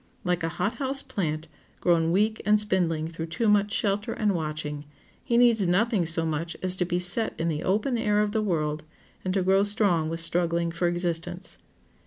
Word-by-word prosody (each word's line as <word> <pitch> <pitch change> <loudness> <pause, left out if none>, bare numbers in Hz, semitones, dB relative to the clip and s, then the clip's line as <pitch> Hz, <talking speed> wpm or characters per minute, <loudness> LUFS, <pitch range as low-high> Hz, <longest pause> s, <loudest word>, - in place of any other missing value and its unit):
Like 180 -1 0
a 165 - -1
hot 225 +2 -1
house 275 0 -2
plant, 155 -4 -3 0.3
grown 165 -2 +2
weak 215 +4 +1
and 210 +1 +3
spindling 175 -6 0
through 165 0 -6
too 190 +8 -2
much 205 0 +3
shelter 205 -1 0
and 210 -2 0
watching, 150 -3 -4 0.4
he 235 - +1
needs 230 -5 +4
nothing 195 0 +1
so 165 0 +4
much 160 +2 -3
as 185 0 +5
to 180 - +1
be 175 0 -1
set 180 +6 +1
in 165 +1 0
the 155 -1 -2
open 215 +6 0
air 210 -2 +1
of 210 -1 +1
the 220 0 0
world, 155 -6 -1 0.4
and 185 - -2
to 190 - +1
grow 190 +1 +3
strong 200 -6 +1
with 165 0 -4
struggling 170 0 +1
for 170 +1 -1
existence. 175 +1 -2
180 Hz, 195 wpm, -26 LUFS, 165-210 Hz, 0.4 s, as